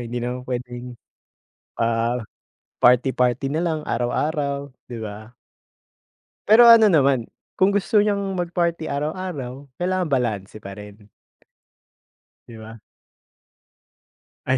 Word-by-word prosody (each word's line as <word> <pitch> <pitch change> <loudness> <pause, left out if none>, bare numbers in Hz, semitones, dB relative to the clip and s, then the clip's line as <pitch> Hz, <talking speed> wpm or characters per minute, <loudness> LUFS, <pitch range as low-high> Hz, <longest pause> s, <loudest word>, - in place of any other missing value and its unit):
hindi 120 0 -4
naman 125 +1 -4
pwedeng, 125 -1 -6 0.8
ah, 115 +1 0 0.6
party 125 +2 +5
party 125 +2 +1
nalang 160 -1 -1
araw-araw, 140 +3 -1 0.2
'di 120 -2 -7
ba?" 110 +2 -9 1.1
Pero 235 +3 +8
ano 225 -2 +8
naman 135 - +3 0.3
kung 195 +2 +3
gusto 205 +2 +2
niyang 200 -2 0
mag 175 -1 -3
party 170 -2 0
araw-araw 145 -3 -4
kailangan 180 +1 -1
balanse 110 -7 -2
pa 100 +1 -9
rin. 105 0 -13 1.4
'Di 115 -1 -11
ba? 110 +1 -11 1.7
Ay. 130 0 +2
130 Hz, 105 wpm, -22 LUFS, 120-170 Hz, 1.7 s, Pero